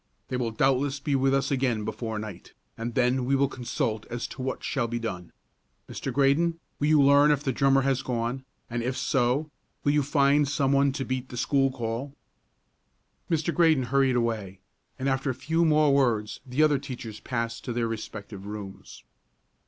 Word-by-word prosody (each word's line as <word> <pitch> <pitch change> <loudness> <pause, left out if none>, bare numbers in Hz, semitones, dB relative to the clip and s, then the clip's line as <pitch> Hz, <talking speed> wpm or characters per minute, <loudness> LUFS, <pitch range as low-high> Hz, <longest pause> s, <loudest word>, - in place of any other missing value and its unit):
They - - -2
will 120 -2 -1
doubtless 135 +4 +1
be 145 0 -2
with 135 0 +2
us 135 0 +1
again 125 -5 0
before 110 0 -4
night, 105 -4 -8 0.2
and 115 +1 -5
then 125 +1 +2
we 135 +2 +2
will 140 +1 +3
consult 115 -4 -3
as 120 0 -4
to 135 - -8
what 130 0 -3
shall 135 -5 -1
be 120 +1 -3
done. 90 -7 -5 0.6
Mr. - - -5
Graydon, 155 +5 +2 0.2
will 145 - +1
you 155 -1 +5
learn 140 +1 +6
if 145 -1 +2
the 135 - 0
drummer 135 +1 +3
has 135 -1 +1
gone, 125 +1 -2 0.2
and 120 0 -3
if 125 +3 -2
so, 135 +4 +1 0.3
will 145 - +3
you 150 0 +3
find 140 0 +3
some 140 -1 +1
one 140 0 +4
to 135 -1 -3
beat 130 0 -3
the 125 - -7
school 135 +2 +2
call?" 130 +2 -4 1.1
Mr. 165 0 0
Graydon 160 -6 +4
hurried 135 -2 +3
away, 110 -6 -2 0.4
and, 135 0 -2
after 135 +1 0
a 130 - -1
few 165 +5 0
more 150 -3 +4
words, 115 -6 +1
the 130 +5 +2
other 150 -3 +3
teachers 120 -5 -7
passed 115 -1 -3
to 125 - -3
their 120 -1 0
respective 105 -3 -7
rooms. 105 -2 -9
130 Hz, 185 wpm, -27 LUFS, 115-140 Hz, 1.1 s, learn